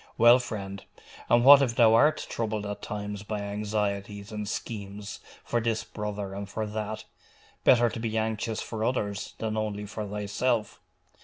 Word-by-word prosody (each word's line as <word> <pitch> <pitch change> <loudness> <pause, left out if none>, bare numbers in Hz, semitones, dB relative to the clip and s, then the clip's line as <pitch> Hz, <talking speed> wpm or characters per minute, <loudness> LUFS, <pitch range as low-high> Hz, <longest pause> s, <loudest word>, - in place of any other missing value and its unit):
Well, 120 +2 +7
friend! 100 -5 -5 0.5
and 120 +1 +5
what 140 0 +10
if 120 -4 +1
thou 115 -2 +6
art 145 +7 +4
troubled 110 -2 -2
at 105 0 -5
times 105 -1 -5
by 105 0 -4
anxieties 100 0 -3
and 105 -1 -4
schemes 100 -2 -5 0.2
for 120 - 0
this 110 -1 0
brother 105 -2 -5
and 100 0 -6
for 110 +1 -3
that? 110 0 -4 0.6
Better 120 -2 +6
to 115 - -4
be 110 -1 -2
anxious 110 0 -1
for 110 -1 -4
others 105 -4 -2
than 110 -1 -2
only 105 -1 -2
for 105 +1 -5
thyself. 105 +3 -1
105 Hz, 160 wpm, -28 LUFS, 100-115 Hz, 0.6 s, what